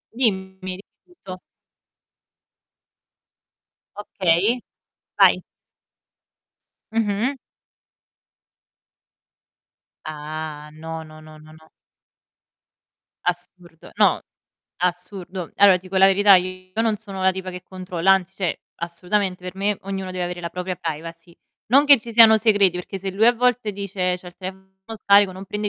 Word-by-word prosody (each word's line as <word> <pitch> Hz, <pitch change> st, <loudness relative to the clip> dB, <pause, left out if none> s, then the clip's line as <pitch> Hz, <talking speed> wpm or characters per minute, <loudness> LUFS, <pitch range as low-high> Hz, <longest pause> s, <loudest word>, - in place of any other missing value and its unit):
Dimmi, 190 Hz, -6 st, 0 dB
dimmi 185 Hz, 0 st, -6 dB, 0.4 s
tutto. 185 Hz, -1 st, -8 dB, 2.6 s
Okay, 200 Hz, +3 st, +1 dB, 0.6 s
vai. -, -, +5 dB, 1.5 s
Mh-mh. 225 Hz, +4 st, 0 dB, 2.7 s
Ah, 155 Hz, 0 st, -7 dB
no, 160 Hz, +1 st, -7 dB
no, 155 Hz, 0 st, -14 dB
no, 155 Hz, 0 st, -14 dB
no, 155 Hz, 0 st, -16 dB
no. 160 Hz, 0 st, -19 dB, 1.6 s
Assurdo. 175 Hz, -1 st, -6 dB
No, -, -, +3 dB, 0.6 s
assurdo. 180 Hz, 0 st, -4 dB
Allora 200 Hz, -2 st, +7 dB
ti 185 Hz, -, -16 dB
dico 190 Hz, -, -5 dB
la 190 Hz, -, +7 dB
verità, 200 Hz, +1 st, +6 dB
io 185 Hz, 0 st, -4 dB
non 225 Hz, -2 st, +1 dB
sono 200 Hz, -2 st, -10 dB
una 190 Hz, 0 st, +3 dB
tipa 185 Hz, 0 st, -6 dB
che 180 Hz, 0 st, -9 dB
controlla, 185 Hz, 0 st, 0 dB
anzi 190 Hz, 0 st, 0 dB
cioè, 190 Hz, -3 st, -3 dB, 0.2 s
assolutamente 180 Hz, +2 st, -2 dB
per 180 Hz, +1 st, -7 dB
me 200 Hz, +1 st, 0 dB
ognuno 190 Hz, -1 st, -5 dB
deve 185 Hz, -1 st, -3 dB
avere 175 Hz, 0 st, -5 dB
la 170 Hz, -, -4 dB
propria 180 Hz, +1 st, -4 dB
privacy. 165 Hz, +2 st, -7 dB, 0.3 s
Non 275 Hz, +5 st, +5 dB
che 285 Hz, -2 st, +7 dB
ci 230 Hz, +1 st, -9 dB
siano 225 Hz, -1 st, +8 dB
segreti, 205 Hz, -5 st, +3 dB
perché 180 Hz, +2 st, -6 dB
se 195 Hz, +1 st, -4 dB
lui 205 Hz, +4 st, +2 dB
a 240 Hz, -, +7 dB
volte 245 Hz, -3 st, +1 dB
dice: 190 Hz, -2 st, -2 dB
"C'ho 180 Hz, -, -11 dB
il 175 Hz, -, -17 dB
telefono 190 Hz, +1 st, -9 dB, 0.4 s
scarico, 200 Hz, -1 st, +5 dB
non 190 Hz, +1 st, -9 dB
prende 210 Hz, +2 st, -3 dB
185 Hz, 130 wpm, -22 LUFS, 175-200 Hz, 2.7 s, siano